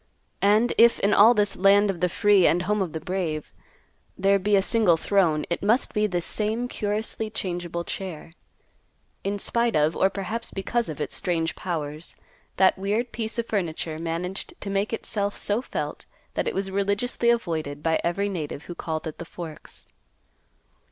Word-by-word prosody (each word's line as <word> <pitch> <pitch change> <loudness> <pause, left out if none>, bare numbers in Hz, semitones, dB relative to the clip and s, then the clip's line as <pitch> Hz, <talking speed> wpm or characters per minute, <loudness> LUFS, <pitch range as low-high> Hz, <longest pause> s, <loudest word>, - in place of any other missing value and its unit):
And 215 +4 +4
if 235 0 +6
in 200 - +2
all 225 +4 +7
this 205 -1 +2
"land 200 +1 +5
of 180 - -8
the 180 +1 +2
free 205 -1 +4
and 175 +2 +2
home 210 +2 0
of 180 -5 -2
the 160 - -3
brave" 165 -3 -3 0.6
there 195 +1 +3
be 205 +2 +2
a 195 - +5
single 210 -7 +3
throne, 165 -5 +2
it 170 - -1
must 225 +6 +2
be 210 -1 +2
this 175 -3 -2
same 220 +3 -1
curiously 215 0 -3
changeable 175 -5 -4
chair. 170 -3 -6 0.9
In 200 +1 -1
spite 235 +3 0
of, 155 +2 +3
or 190 - +3
perhaps 200 +4 -4
because 230 +3 -2
of, 155 - -6
its 150 - -2
strange 165 -2 -1
powers, 155 -3 -5 0.4
that 190 0 +4
weird 215 +5 -1
piece 225 -1 -4
of 235 - 0
furniture 165 -6 -2
managed 170 +3 -4
to 200 - -4
make 195 +2 0
itself 205 -2 -2
so 210 +3 -1
felt - - -5 0.3
that - - -1
it - - -2
was 195 0 -1
religiously 200 +5 0
avoided 160 -10 -1
by 160 -1 +2
every 190 +4 0
native 155 -6 -4
who 175 - -7
called 160 -2 -4
at 160 - -6
the - - -4
Forks. 165 -2 -9
195 Hz, 175 wpm, -25 LUFS, 170-210 Hz, 0.9 s, all